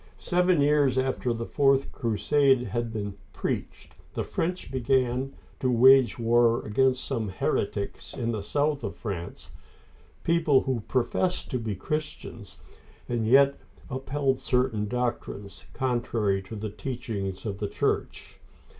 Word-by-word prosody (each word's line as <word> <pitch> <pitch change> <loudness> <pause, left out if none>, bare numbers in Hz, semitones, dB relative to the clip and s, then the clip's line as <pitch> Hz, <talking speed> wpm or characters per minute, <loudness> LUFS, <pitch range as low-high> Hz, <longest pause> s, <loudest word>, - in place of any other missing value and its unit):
Seven 180 -3 +2
years 145 -3 +3
after 130 -1 0
the 115 0 -3
fourth 135 0 +2
crusade 130 +3 +2
had 120 -2 -3
been 105 -2 -4 0.2
preached, - - -4 0.2
the - - -1
French 180 +2 -3
began 130 +1 0 0.2
to 130 - +1
wage 125 -1 +6
war 115 0 +3
against 130 +4 +2
some 115 -6 -2
heretics 100 +1 -2
in 120 -3 -1
the 110 -3 -3
south 145 +7 0
of - - -4
France 95 -7 -6 0.3
— - - -29
people 160 -5 +3
who 130 -3 -1
professed 170 +9 0
to 125 - 0
be 110 -3 -3
Christians, 110 - -5 0.5
and 115 -2 -1
yet 140 +3 +5 0.3
upheld 135 +1 -1
certain 125 -5 0
doctrines 120 -4 -4
contrary 120 -6 0
to 95 +4 -9
the 105 0 -4
teachings 105 -4 -5
of 100 -2 -4
the 105 - -1
Church. - - -2
125 Hz, 135 wpm, -27 LUFS, 110-135 Hz, 0.5 s, wage